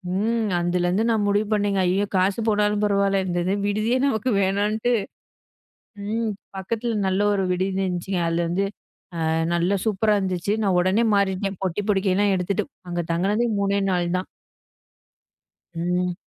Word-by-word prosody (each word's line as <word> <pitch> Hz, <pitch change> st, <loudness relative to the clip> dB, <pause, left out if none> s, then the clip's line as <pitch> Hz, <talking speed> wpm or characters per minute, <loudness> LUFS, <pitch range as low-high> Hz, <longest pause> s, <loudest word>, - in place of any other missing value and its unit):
ம். 225 Hz, +2 st, 0 dB
அதுலருந்து 175 Hz, +3 st, +1 dB
நான் 220 Hz, -2 st, +2 dB
முடிவு 205 Hz, +1 st, +1 dB
பண்ணேங்க. 205 Hz, -2 st, +1 dB
ஐய்யயோ! 190 Hz, +3 st, +1 dB
காசு 190 Hz, +3 st, +2 dB
போனாலும் 210 Hz, -1 st, +2 dB
பரவால 200 Hz, -1 st, +2 dB
இந்த 175 Hz, -1 st, -2 dB
இது 190 Hz, -, +1 dB
விடுதியே 215 Hz, +5 st, +1 dB
நமக்கு 255 Hz, -3 st, 0 dB
வேணாட்டு 205 Hz, +4 st, 0 dB, 1.2 s
ம். 230 Hz, 0 st, 0 dB, 0.3 s
பக்கத்துல 230 Hz, +5 st, -2 dB
நல்ல 190 Hz, +1 st, +1 dB
ஒரு 195 Hz, -, +1 dB
விடுதி 190 Hz, +1 st, -1 dB
இருந்துச்சுங்க. 180 Hz, 0 st, -2 dB
அதில 170 Hz, +1 st, 0 dB
வந்து 185 Hz, +3 st, 0 dB, 0.6 s
அ -, -, +1 dB, 0.2 s
நல்லா 175 Hz, +4 st, +1 dB
சூப்பரா 215 Hz, 0 st, +2 dB
இருந்துச்சு. 185 Hz, 0 st, -1 dB
நான் 190 Hz, -3 st, +2 dB
உடனே 190 Hz, +6 st, +2 dB
மாறிட்டேன் 195 Hz, -1 st, 0 dB
பொட்டி 190 Hz, +2 st, -1 dB
பொடிக்கைலாம் 195 Hz, 0 st, +2 dB
எடுத்துட்டு 180 Hz, +2 st, -1 dB, 0.2 s
அங்க 175 Hz, 0 st, -2 dB
தங்குனது 205 Hz, +7 st, +1 dB
3 200 Hz, 0 st, +1 dB
நாள் 175 Hz, -1 st, 0 dB
தான். 185 Hz, -, -4 dB, 1.5 s
ம். 180 Hz, +1 st, -1 dB
195 Hz, 140 wpm, -23 LUFS, 180-210 Hz, 1.5 s, நான்